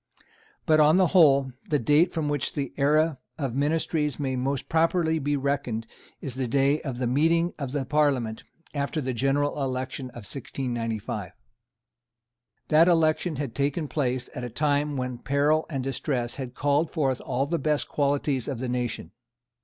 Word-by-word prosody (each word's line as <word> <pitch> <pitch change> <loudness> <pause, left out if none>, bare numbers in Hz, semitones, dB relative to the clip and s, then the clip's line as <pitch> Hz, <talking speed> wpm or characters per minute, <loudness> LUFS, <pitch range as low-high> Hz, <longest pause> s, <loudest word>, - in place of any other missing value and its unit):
But, 155 -2 +4
on 155 +3 +6
the 190 - +5
whole, 140 -7 +5 0.2
the 150 - +3
date 150 +7 +3
from 160 -3 -2
which 145 -2 -1
the 140 -3 -3
era 150 +1 +2 0.2
of 135 -6 -2
ministries 150 +1 0
may 135 -2 -1
most 135 +1 -2
properly 160 0 +2
be 145 0 0
reckoned 135 -5 -1 0.4
is 135 - -4
the 130 0 -2
day 140 +4 +2
of 135 -4 -5
the 125 - -1
meeting 165 +7 +2
of 140 -3 -4
the 140 -1 -2
Parliament 135 -6 +1 0.3
after 140 +2 -2
the 130 -3 -2
general 140 +4 0
election 130 0 -3
of 120 -3 -10
1695. 115 -7 -4 1.4
That 160 +2 +6
election 165 -1 +2
had 140 -4 -4
taken 145 +3 -1
place 130 -4 -1
at 125 - -6
a 120 - -4
time 145 +3 0
when 125 -1 -3
peril 145 +5 +1
and 135 -5 -3
distress 130 -2 -2
had 130 -2 -6
called 145 +4 +1
forth 135 -6 0
all 135 +3 -1
the 165 +3 -1
best 150 +1 0
qualities 140 -2 0
of 135 - -3
the 130 +2 -3
nation. 120 -2 -3
140 Hz, 165 wpm, -26 LUFS, 130-150 Hz, 1.4 s, on